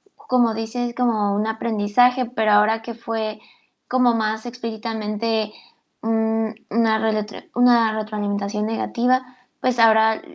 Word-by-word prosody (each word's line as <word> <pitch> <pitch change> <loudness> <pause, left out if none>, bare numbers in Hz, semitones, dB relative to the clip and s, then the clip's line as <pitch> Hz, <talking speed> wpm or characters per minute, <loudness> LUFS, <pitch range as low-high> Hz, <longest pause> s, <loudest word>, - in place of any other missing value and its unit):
como 240 -3 +1
dices, 235 +2 -3
como 220 -5 +1
un 210 +2 0
aprendizaje, 230 +3 +2
pero 220 -3 0
ahora, 220 +2 +4
que 235 +1 -7
fue 225 -2 -4 0.5
como 250 -2 +3
más 220 +1 -2
explícitamente, 220 -2 -3 0.5
mm, 225 0 0 0.2
una 225 0 +2
reletro 215 -1 -2 0.2
una 240 -2 +4
retroalimentación 210 -1 -3
negativa, 245 +3 0 0.4
pues 250 -2 0
ahora, 220 -1 +5
225 Hz, 115 wpm, -21 LUFS, 215-235 Hz, 0.5 s, ahora